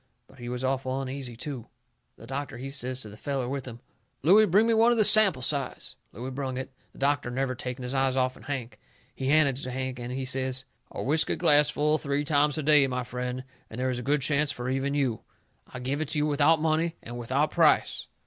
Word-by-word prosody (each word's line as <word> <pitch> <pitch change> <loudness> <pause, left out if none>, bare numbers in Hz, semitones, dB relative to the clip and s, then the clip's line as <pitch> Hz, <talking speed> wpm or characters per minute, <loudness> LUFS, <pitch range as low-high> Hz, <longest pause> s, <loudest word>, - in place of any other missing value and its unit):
But 130 - -20
he 120 0 -6
was 125 +1 -4
awful 130 0 -1
uneasy 130 -2 -5
too. 125 -1 -6 0.5
The 115 - -12
doctor, 135 +2 -5
he 135 +3 -6
says 130 -2 -1
to 110 - -6
the 105 - -11
feller 135 +2 -3
with 135 0 -4
him: 120 -1 -9 0.4
"Looey, 205 +8 +6
bring 205 +6 +4
me 230 - +3
one 225 +2 +5
of 240 - +2
the 215 - +5
sample 205 - +6
size." 140 0 -2 0.2
Looey 125 +5 -7
brung 130 -1 -4
it, 130 - -5 0.2
the - - -20
doctor 140 -2 0
never 130 +1 -1
taking 125 +1 -6
his 125 +1 -4
eyes 135 -1 +1
off'n 130 -1 -1
Hank. 130 -5 -5 0.3
He 130 - -4
handed 140 -2 +3
it - - -5
to 130 - -5
Hank, 130 0 -4
and 120 +1 -5
he 130 +1 -3
says: 130 0 -1 0.2
"A - - -6
whiskey 155 +4 +2
glass 145 0 +4
full 150 +1 +1
three 140 0 -1
times 150 0 +2
a 155 - -2
day, 145 -2 +5
my 125 -1 -2
friend, 125 +1 -4 0.3
and 110 - -8
there 130 0 0
is 125 - -3
a - - -4
good 140 +2 0
chance 145 +1 +2
for 125 -2 -4
even 135 +2 -1
you. 130 -7 0 0.5
I - - -7
give 135 +4 -2
it 155 - -2
to - - -1
you, 150 - +2
without 150 +2 +3
money 160 +1 0
and 120 +1 -7
without 130 +6 0
price." 165 -3 +2
135 Hz, 235 wpm, -27 LUFS, 125-150 Hz, 0.5 s, Looey